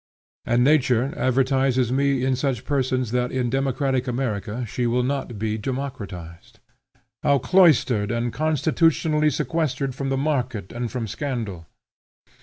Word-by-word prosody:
And 120 +1 +3
nature 135 -3 +3
advertises 130 -1 +1
me 135 -1 +1
in 130 -1 +2
such 130 -3 -2
persons 130 -4 0
that 125 0 0
in 125 -2 -1
democratic 135 -1 0
America 120 -2 -2
she 120 +3 -1
will 125 +1 +1
not 130 -3 -3
be 110 +1 -2
democratized. 105 -10 -6 0.6
How 140 - +3
cloistered 130 - +3
and 120 0 -1
constitutionally 155 +1 +2
sequestered 140 -2 -1
from 135 +1 -3
the 135 - 0
market 130 - -2
and 120 0 -3
from 125 -3 -3
scandal! 110 - -4
130 Hz, 130 wpm, -23 LUFS, 120-140 Hz, 0.6 s, And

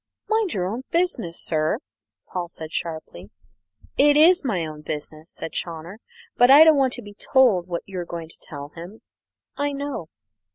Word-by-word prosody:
"Mind 435 -3 +1
your 180 -2 0
own 220 +7 -3
business, 335 - -1
sir," 155 +4 0 0.5
said - - -31
Paul 175 -2 -3 0.2
sharply. 155 - -5 0.7
"It 290 +1 +6
is 350 +4 +6
my 195 -11 -1
own 155 -1 -8
business," 155 +1 -6
said 160 - -6
Chawner; 170 +6 -5 0.4
"but 245 +1 +6
I 285 +3 +10
don't 320 -1 +7
want 265 -2 +2
to 245 - -6
be 205 0 -11
told 210 -5 +3
what 170 -1 -3
you're 185 -3 -5
going 170 -2 -7
to - - -17
tell 145 -2 -8
him. 175 +7 -11 0.5
I 285 0 -1
know." 280 - -4
185 Hz, 170 wpm, -23 LUFS, 165-275 Hz, 0.7 s, I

